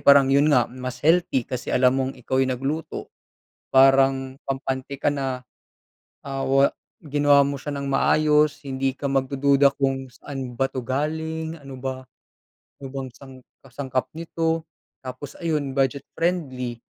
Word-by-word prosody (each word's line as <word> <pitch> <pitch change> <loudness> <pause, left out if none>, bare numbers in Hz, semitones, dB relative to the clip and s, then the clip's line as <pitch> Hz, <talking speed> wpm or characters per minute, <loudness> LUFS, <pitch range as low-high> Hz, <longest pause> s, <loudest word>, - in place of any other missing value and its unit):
parang 140 -1 +6
yun 140 +2 +5
nga 125 -6 +5
mas 130 +1 -7
healthy 165 -6 +3
kasi 125 +1 -5
alam 125 0 +4
mong 130 0 -1
ikaw 130 +1 -1
yung 130 -1 +1
nagluto, 145 +6 -4 0.6
parang 135 0 +4
kampante 135 0 -3
ka 145 - +1
na, 135 -3 -3 0.8
ah, 135 -1 -3
wa 135 +1 +4 0.4
ginawa 145 -1 +4
mo 140 -1 -4
siya 145 -1 -4
nang 140 - -4
maayos, 150 +2 +3
hindi 135 0 0
ka 145 - -2
magdududa 140 +1 +3
kung 135 -1 -1
saan 130 -2 -7
ba 135 - +3
'to 130 -1 -5
galing, 160 +5 -2
ano 135 -2 -9
ba 130 0 -4 0.8
ano 140 - -8
bang 135 -2 -4
sang 130 +1 -14 0.2
kasangkap 130 0 -3
nito. 165 0 -1 0.4
Tapos, 130 +2 -7
ayun, 150 -5 -1
budget-friendly, 135 -2 -1
135 Hz, 140 wpm, -24 LUFS, 130-145 Hz, 0.8 s, parang